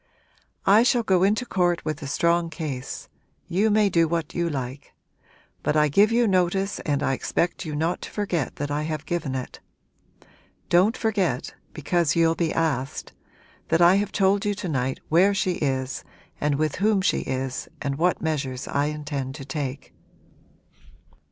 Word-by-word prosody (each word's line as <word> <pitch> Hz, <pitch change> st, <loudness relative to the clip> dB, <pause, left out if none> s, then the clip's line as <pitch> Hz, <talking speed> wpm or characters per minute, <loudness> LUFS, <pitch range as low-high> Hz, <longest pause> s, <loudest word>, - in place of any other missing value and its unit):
'I 205 Hz, +3 st, +6 dB
shall 240 Hz, 0 st, +3 dB
go 190 Hz, -4 st, +2 dB
into 210 Hz, +5 st, +2 dB
court 175 Hz, -5 st, 0 dB
with 155 Hz, 0 st, -3 dB
a 140 Hz, -, -5 dB
strong 170 Hz, +3 st, +1 dB
case. 150 Hz, -5 st, -5 dB, 0.4 s
You 200 Hz, +5 st, +2 dB
may 210 Hz, 0 st, +4 dB
do 170 Hz, -3 st, +3 dB
what 165 Hz, -1 st, -2 dB
you 170 Hz, -1 st, 0 dB
like. 135 Hz, -1 st, -6 dB, 0.7 s
But 150 Hz, -, +1 dB
I 150 Hz, 0 st, +4 dB
give 205 Hz, +9 st, +4 dB
you 235 Hz, +1 st, +3 dB
notice 190 Hz, +1 st, +1 dB
and 145 Hz, -2 st, -1 dB
I 135 Hz, -1 st, +1 dB
expect 170 Hz, +6 st, -1 dB
you 150 Hz, -, -4 dB
not 165 Hz, +4 st, -1 dB
to -, -, -7 dB
forget 180 Hz, -, -2 dB
that 145 Hz, 0 st, -4 dB
I 145 Hz, +1 st, 0 dB
have 155 Hz, -1 st, -4 dB
given 160 Hz, -6 st, -2 dB
it. 130 Hz, -1 st, -6 dB, 1.1 s
Don't 190 Hz, +7 st, +4 dB
forget 190 Hz, -, -1 dB, 0.2 s
because 165 Hz, 0 st, 0 dB
you'll 165 Hz, -1 st, +4 dB
be 165 Hz, -1 st, -1 dB
asked 140 Hz, -5 st, -2 dB, 0.5 s
that 165 Hz, -, +2 dB
I 175 Hz, +2 st, +6 dB
have 205 Hz, +1 st, -1 dB
told 200 Hz, 0 st, +2 dB
you 205 Hz, -1 st, 0 dB
to 190 Hz, -, -5 dB
night 130 Hz, -4 st, -1 dB
where 190 Hz, +5 st, +4 dB
she 190 Hz, -1 st, +1 dB
is 130 Hz, -2 st, -2 dB, 0.4 s
and 145 Hz, -1 st, +1 dB
with 155 Hz, 0 st, -1 dB
whom 205 Hz, 0 st, +2 dB
she 190 Hz, -, +2 dB
is 130 Hz, 0 st, -3 dB
and 140 Hz, 0 st, -3 dB
what 175 Hz, +1 st, +1 dB
measures 140 Hz, -5 st, -2 dB
I 140 Hz, +1 st, 0 dB
intend 145 Hz, -3 st, -4 dB
to 140 Hz, -3 st, -8 dB
take.' 140 Hz, -1 st, -5 dB
165 Hz, 170 wpm, -24 LUFS, 145-190 Hz, 1.1 s, I